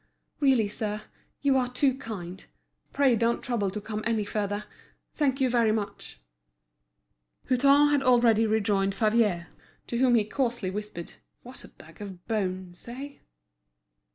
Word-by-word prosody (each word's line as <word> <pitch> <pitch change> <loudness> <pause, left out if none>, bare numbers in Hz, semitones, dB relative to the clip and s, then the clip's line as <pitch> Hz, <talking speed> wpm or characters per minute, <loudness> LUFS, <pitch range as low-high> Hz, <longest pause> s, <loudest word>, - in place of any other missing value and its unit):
"Really, 265 -7 +3
sir, 210 0 -4 0.4
you 280 -2 +3
are 250 -1 +1
too 260 +1 +2
kind. 190 -8 -7 0.5
Pray 275 -4 +3
don't 230 +1 0
trouble 230 -6 -1
to 205 +3 -5
come 210 +1 -5
any 225 -3 0
further. 205 0 -2 0.5
Thank 275 -3 0
you 265 - +3
very 235 -3 +3
much." 205 - -4 1.3
Hutin 280 +3 +5
had 290 -1 +3
already 235 -4 +4
rejoined 200 -2 +1
Favier, 215 -5 +1 0.4
to 235 - -3
whom 250 -2 +4
he 220 - +4
coarsely 235 -3 -2
whispered: 205 -4 -6 0.3
"What 250 +2 -10
a - - -11
bag - - -16
of 190 -3 -9
bones—eh?" 215 +6 -4
225 Hz, 135 wpm, -27 LUFS, 205-255 Hz, 1.3 s, Hutin